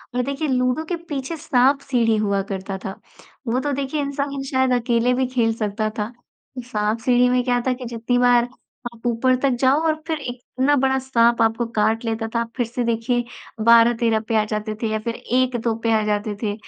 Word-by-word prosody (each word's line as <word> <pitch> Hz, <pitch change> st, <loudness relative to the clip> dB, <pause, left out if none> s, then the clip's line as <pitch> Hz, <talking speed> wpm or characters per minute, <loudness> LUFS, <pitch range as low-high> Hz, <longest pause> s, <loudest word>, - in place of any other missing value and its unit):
और 250 Hz, -, +2 dB
देखिए 280 Hz, +3 st, -2 dB
लूडो 255 Hz, +3 st, +1 dB
के 350 Hz, -, -2 dB
पीछे 280 Hz, +3 st, -3 dB
साँप-सीढ़ी 260 Hz, -5 st, +2 dB
हुआ 200 Hz, -2 st, +1 dB
करता 190 Hz, 0 st, -4 dB
था, 190 Hz, -, -6 dB, 0.5 s
वो 245 Hz, +3 st, +1 dB
तो 290 Hz, +2 st, -2 dB
देखिए 280 Hz, +2 st, -2 dB
इंसान 280 Hz, 0 st, -3 dB
शायद 260 Hz, -1 st, +1 dB
अकेले 245 Hz, 0 st, +2 dB
भी 260 Hz, +1 st, +1 dB
खेल 235 Hz, -3 st, +1 dB
सकता 215 Hz, 0 st, -2 dB
था। 210 Hz, +2 st, -2 dB, 0.5 s
साँप-सीढ़ी 240 Hz, +2 st, +1 dB
में 250 Hz, 0 st, +2 dB
क्या 245 Hz, -1 st, +1 dB
था 255 Hz, -, +3 dB
कि 250 Hz, 0 st, -8 dB
जितनी 235 Hz, +1 st, -1 dB
बार, 245 Hz, -1 st, +5 dB, 0.5 s
आप 235 Hz, +1 st, -19 dB
ऊपर 255 Hz, +2 st, +2 dB
तक 275 Hz, -, +3 dB
जाओ 270 Hz, +3 st, +4 dB
और 310 Hz, -, +2 dB
फिर 320 Hz, -2 st, -1 dB
इतना 260 Hz, +3 st, -1 dB
बड़ा 265 Hz, 0 st, +2 dB
साँप 235 Hz, -3 st, +2 dB
आपको 225 Hz, +1 st, +2 dB
काट 220 Hz, +2 st, +1 dB
लेता 225 Hz, 0 st, -2 dB
था 235 Hz, -, +2 dB
फिर 245 Hz, -2 st, 0 dB
से 240 Hz, +2 st, -3 dB
देखिए, 235 Hz, +1 st, 0 dB, 0.4 s
12-13 230 Hz, -1 st, +5 dB
पे 225 Hz, -, 0 dB
आ -, -, 0 dB
जाते 215 Hz, 0 st, -3 dB
थे 225 Hz, -, 0 dB
या 220 Hz, -, 0 dB
फिर 230 Hz, +1 st, -4 dB
1-2 245 Hz, -2 st, 0 dB
पे 230 Hz, -, +2 dB
आ -, -, -1 dB
जाते 210 Hz, 0 st, -1 dB
थे, 205 Hz, -, 0 dB
245 Hz, 195 wpm, -22 LUFS, 225-260 Hz, 0.5 s, बार